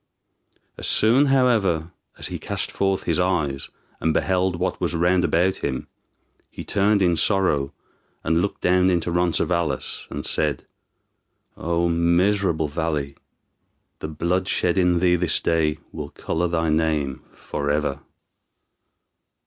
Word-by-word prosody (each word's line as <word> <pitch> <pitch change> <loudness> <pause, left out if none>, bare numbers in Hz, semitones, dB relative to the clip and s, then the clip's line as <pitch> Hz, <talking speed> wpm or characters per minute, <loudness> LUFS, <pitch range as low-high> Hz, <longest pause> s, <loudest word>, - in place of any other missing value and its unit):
As - - -3
soon, 125 +7 +4
however, 110 -12 +2 0.3
as - - -6
he - - -5
cast - - -2
forth 95 -1 0
his 85 0 0
eyes, 80 -7 -1 0.3
and 80 -1 0
beheld 95 -1 +1
what 90 +1 -2
was - - -1
round 90 +2 +2
about 90 +3 +2
him, 65 - -3 0.6
he - - -8
turned 100 0 +2
in 85 -2 +3
sorrow, 80 -8 +1 0.5
and 80 +1 +2
looked 100 - -3
down 90 +1 +3
into 85 -1 0
Roncesvalles, 85 -4 -1
and 75 - -5
said, 75 -4 -1 0.9
"O 85 +1 0
miserable 85 0 +2
valley! 75 -3 -2 0.8
the - - -5
blood 85 +4 -1
shed 85 -3 +1
in 90 -2 +3
thee 90 -1 +4
this 85 -2 +1
day 80 -2 +1
will - - -6
color 85 +2 -2
thy 80 -1 0
name 75 -4 0
forever." 70 -1 -2
85 Hz, 130 wpm, -23 LUFS, 80-95 Hz, 0.9 s, soon